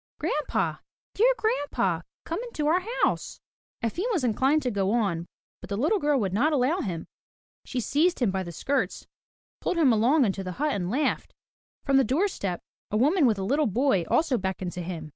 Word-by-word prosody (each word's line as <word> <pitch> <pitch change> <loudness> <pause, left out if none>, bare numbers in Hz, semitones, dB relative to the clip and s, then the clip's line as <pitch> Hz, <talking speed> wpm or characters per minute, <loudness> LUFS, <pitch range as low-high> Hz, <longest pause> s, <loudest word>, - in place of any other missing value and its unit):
"Grandpa! 300 - -1 0.4
Dear 475 +5 +4
Grandpa! 290 - 0 0.2
Come 335 +6 -3
into 470 -12 -4
our 335 +5 +3 0.2
house!'' - - 0 0.4
Efim 285 - -1
was 355 - 0
inclined 265 +6 +2
to 250 - 0
go 195 -2 0
on, 185 -8 0 0.3
but - - -10
the 200 - -2
little 315 - +2
girl 290 -4 +2
would 195 -5 -1
not 275 +10 +2
allow 290 +5 +2
him. 175 - -3 0.6
She 255 - -3
seized 310 +9 +2
him 235 -7 +2
by 190 0 -1
the 175 -2 -6
skirts, 275 - -2 0.5
pulled 365 - -1
him 285 -7 +5
along 250 +6 +4
into 195 -2 -2
the 185 -1 -5
hut 295 +6 0
and 180 -3 -2
laughed. 280 +8 -1 0.5
From 275 -1 +4
the 270 - +5
doorstep 260 - -1 0.3
a 210 - 0
woman 290 - +4
with 220 -3 +2
a 195 - -3
little 280 +8 +2
boy 225 -3 +2
also 280 -7 +2
beckoned 190 -1 -3
to 180 - -5
him. 165 -3 -6
250 Hz, 190 wpm, -26 LUFS, 195-305 Hz, 0.6 s, him